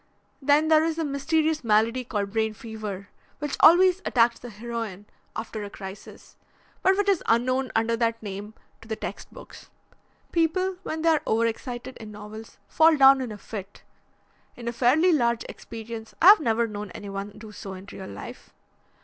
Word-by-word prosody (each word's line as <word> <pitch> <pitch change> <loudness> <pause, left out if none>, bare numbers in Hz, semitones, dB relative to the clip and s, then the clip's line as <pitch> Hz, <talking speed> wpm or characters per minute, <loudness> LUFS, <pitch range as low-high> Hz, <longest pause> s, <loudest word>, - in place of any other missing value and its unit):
Then 290 +3 +3
there 315 -1 +6
is 325 0 0
the 325 -1 -2
mysterious 310 +2 0
malady 230 +3 +2
called 205 -4 -3
brain 220 0 0
fever, 210 -3 -7 0.3
which 295 -1 -3
always 365 +3 +6
attacks 235 -1 +2
the 245 - -9
heroine 220 -2 -6 0.3
after 220 -1 -5
a 205 - -6
crisis, 195 0 -11 0.4
but 380 +1 +3
which 410 0 +1
is 390 -4 +3
unknown 255 +3 +1
under 225 +1 +2
that 230 -1 -1
name 205 +1 -7 0.3
to 225 - -14
the 220 - -2
text - - -7
books. - - -13 0.6
People 365 +3 +1
when 320 -4 -4
they 330 - +4
are 315 -2 +3
over 225 +1 +2
excited 240 +2 -4
in 215 -2 -10
novels 210 +1 -10
fall 320 0 +5
down 270 -1 +7
in 250 -3 -4
a 210 - -7
fit. 200 -1 -9 0.7
In 235 -1 -9
a 235 - -1
fairly 270 +9 +4
large 235 -5 +1
experience 225 -1 -9
I 360 - +8
have 420 - +9
never 235 -5 +1
known 210 -2 -6
anyone 200 0 -6
do 215 0 -11
so 195 -2 -8
in 185 +1 -10
real 190 - -8
life. 100 +1 -10
230 Hz, 175 wpm, -25 LUFS, 215-295 Hz, 0.7 s, have